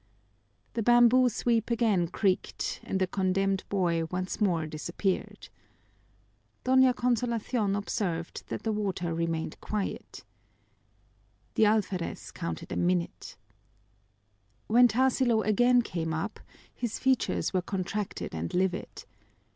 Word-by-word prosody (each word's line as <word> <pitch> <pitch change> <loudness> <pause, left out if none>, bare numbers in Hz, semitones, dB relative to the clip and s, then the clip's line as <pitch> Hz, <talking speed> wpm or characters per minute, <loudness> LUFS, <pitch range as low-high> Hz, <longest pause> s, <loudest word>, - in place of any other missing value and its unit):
The 230 - -1
bamboo 240 +2 +5
sweep 230 0 0
again 220 -7 +2
creaked, 185 +1 -1
and 190 - -2
the 190 - +3
condemned 195 +1 0
boy 170 -4 +1
once 185 +5 -4
more 170 -6 +2
disappeared. 170 +5 -3 1.2
Doña 260 -1 +5
Consolacion 235 -3 0
observed 185 -5 -3
that - - -5
the 225 - 0
water 190 -5 -2
remained 165 -1 -2
quiet. 210 -2 -4 1.3
The 220 - +4
alferez 200 -5 -1
counted 170 -1 -5
a - - -2
minute. 175 -1 -1 1.3
When 245 +3 +6
Tarsilo 245 -1 +2
again 245 +4 +4
came 165 -5 -3
up 195 +7 -4 0.3
his 235 -3 -3
features 260 -5 +1
were 185 - +2
contracted 195 +2 -4
and 80 +1 -4
livid. 185 +1 -2
200 Hz, 110 wpm, -29 LUFS, 180-235 Hz, 1.3 s, When